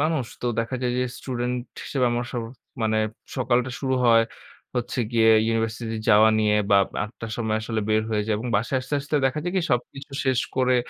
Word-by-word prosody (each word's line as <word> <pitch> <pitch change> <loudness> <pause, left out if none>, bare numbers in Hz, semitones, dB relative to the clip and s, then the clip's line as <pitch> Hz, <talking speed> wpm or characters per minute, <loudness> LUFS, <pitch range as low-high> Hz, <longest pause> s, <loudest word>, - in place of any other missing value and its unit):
মানুষ। 155 -4 +1 0.2
তো 125 - -1
দেখা 115 +3 -3
যায় 125 - +1
যে - - +2 0.2
স্টুডেন্ট 125 -1 -2 0.3
হিসেবে 130 -3 0
আমার 120 +1 -1
সব 120 - -2 0.4
মানে 110 0 +1 0.4
সকালটা 125 0 +1
শুরু 130 -1 0
হয় 115 -1 +6 0.5
হচ্ছে 125 +1 -2
গিয়ে 115 -1 +4 0.2
ইউনিভার্সিটি 115 0 -1
যাওয়া 110 0 +7
নিয়ে 105 -1 +3 0.2
বা 100 - +7
আব - - -3
৮ঃ০০ 110 +2 -7
র - - -9
সময় 110 -2 0
আসলে 110 0 -2
বের 110 0 +3
হয়ে 105 -1 +1
যায় 110 - +1
এবং 115 - -5
বাসায় 120 +6 0
আসতে, 130 +3 -4
আসতে 140 +2 -5
দেখা 135 +3 -1
যায় 175 - -2
কি - - +3
সবকিছু 135 +3 -2
শেষ 130 -2 +3 0.2
করে 130 -1 +3
120 Hz, 205 wpm, -24 LUFS, 110-130 Hz, 0.5 s, যাওয়া